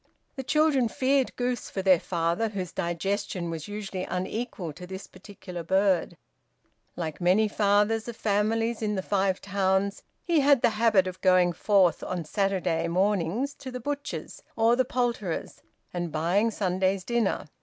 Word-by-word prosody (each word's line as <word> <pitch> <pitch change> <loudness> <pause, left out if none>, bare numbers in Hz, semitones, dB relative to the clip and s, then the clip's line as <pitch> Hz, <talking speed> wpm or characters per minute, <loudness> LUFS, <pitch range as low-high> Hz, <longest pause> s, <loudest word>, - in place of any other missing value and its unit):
The 270 - -3
children 290 -2 +2
feared 265 +3 +1
goose 245 0 -2
for 190 - -4
their 185 -3 +5
father, 170 +6 -1
whose 185 -5 -5
digestion 180 0 -2
was 160 -2 -5
usually 205 -3 -5
unequal 185 - -4
to 180 +4 -10
this 190 +1 -7
particular 185 -2 -9
bird. 190 -1 +1 0.8
Like 160 -1 -5
many 190 +5 +4
fathers 210 +2 +2
of 235 - -5
families 225 +2 0
in 210 -1 0
the 190 - -2
Five 190 -1 0
Towns, 195 0 0 0.2
he 340 -3 +2
had 280 -2 +4
the - - +5
habit 215 -3 +3
of 185 0 -6
going 185 -2 +4
forth 190 -1 +3
on 180 -3 -3
Saturday 180 -3 0
mornings 200 - 0
to 260 - -7
the 250 0 -5
butcher's 285 +3 -5
or 225 +1 +4
the 255 +1 +2
poulterer's 235 -8 -2 0.3
and 175 -2 -3
buying 175 +8 +1
Sunday's 190 -2 0
dinner. 235 -1 0
200 Hz, 155 wpm, -27 LUFS, 180-225 Hz, 0.8 s, their